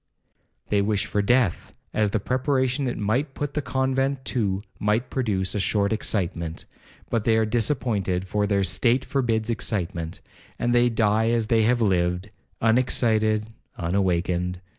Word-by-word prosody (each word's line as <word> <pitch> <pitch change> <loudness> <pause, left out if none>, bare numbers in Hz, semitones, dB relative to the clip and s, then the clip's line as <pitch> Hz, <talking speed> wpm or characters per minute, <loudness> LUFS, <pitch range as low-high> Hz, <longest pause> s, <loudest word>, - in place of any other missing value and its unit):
They 100 -1 +2
wish 100 -1 0
for 105 - 0
death, 120 -3 +1 0.2
as 105 -1 +2
the 110 - 0
preparation 130 +3 0
it 120 - -3
might 125 +7 -1
put 145 -1 -3
the 150 - -1
convent 130 0 -1
to 100 -5 0 0.2
might 105 +4 0
produce 100 -8 -1
a 105 - -1
short 100 +1 +1
excitement, 85 -6 -2 0.5
but 115 -3 +1
they 110 0 +3
are 110 - +3
disappointed, 105 -6 0
for 105 +1 0
their 100 -1 +2
state 115 +8 +2
forbids 120 -5 0
excitement, 90 -7 -3 0.4
and 120 0 0
they 120 0 +4
die 110 -1 +2
as 115 -1 +1
they 115 - +4
have 120 +1 +2
lived,—unexcited, 110 +4 0 0.3
unawakened. 90 0 0
110 Hz, 140 wpm, -24 LUFS, 100-120 Hz, 0.5 s, they